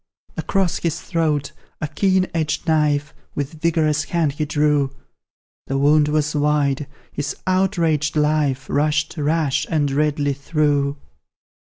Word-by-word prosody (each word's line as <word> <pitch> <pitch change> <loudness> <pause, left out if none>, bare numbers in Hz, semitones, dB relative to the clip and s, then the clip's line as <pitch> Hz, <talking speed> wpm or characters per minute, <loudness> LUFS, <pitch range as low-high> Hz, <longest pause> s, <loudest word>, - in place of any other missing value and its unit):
Across 190 -3 0
his 170 -1 -1
throat 155 -5 -1 0.3
a 155 - -2
keen 185 +4 +2
edged 155 0 -1
knife 150 -2 +1 0.2
With 150 +2 -4
vigorous 155 -3 +1
hand 165 -3 0
he 150 +2 -2
drew; 150 -2 +2 0.8
The 135 - -1
wound 150 +2 +4
was 150 0 0
wide 145 -1 +1 0.2
his 145 +1 -3
outraged 170 -6 +1
life 150 -3 +1
Rushed 150 +2 0
rash 150 -2 0
and 145 -3 +1
redly 145 0 +1
through. 145 0 0
150 Hz, 120 wpm, -21 LUFS, 145-160 Hz, 0.8 s, wound